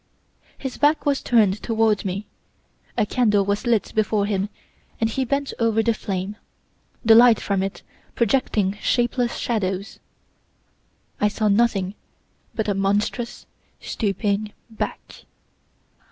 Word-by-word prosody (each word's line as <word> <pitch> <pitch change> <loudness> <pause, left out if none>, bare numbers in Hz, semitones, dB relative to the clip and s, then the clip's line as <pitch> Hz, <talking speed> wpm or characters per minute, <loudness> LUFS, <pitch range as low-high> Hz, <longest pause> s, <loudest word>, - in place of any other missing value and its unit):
His 265 -2 -6
back 300 +2 +3
was 285 -2 +1
turned 210 -4 +3
toward 225 -3 +1
me. 195 +2 -3 0.7
A 225 - +3
candle 210 -3 +2
was 205 +5 -1
lit 225 -4 +1
before 215 -1 +1
him, 200 -1 -1 0.5
and 225 - +2
he 265 - 0
bent 280 +2 -1
over 225 -1 +2
the 230 - +2
flame, 195 -1 -4 0.7
the 225 - +8
light 235 0 +7
from 195 -2 -1
it 195 0 -4 0.3
projecting 210 -4 +1
shapeless 240 0 +1
shadows. 195 -4 -2 1.2
I 210 - +3
saw 210 +1 0
nothing 200 -3 +2 0.6
but 220 -2 -1
a 205 - +2
monstrous, 205 +5 -1 0.3
stooping 205 0 -2 0.2
back. 220 - -6
215 Hz, 125 wpm, -23 LUFS, 200-235 Hz, 1.2 s, the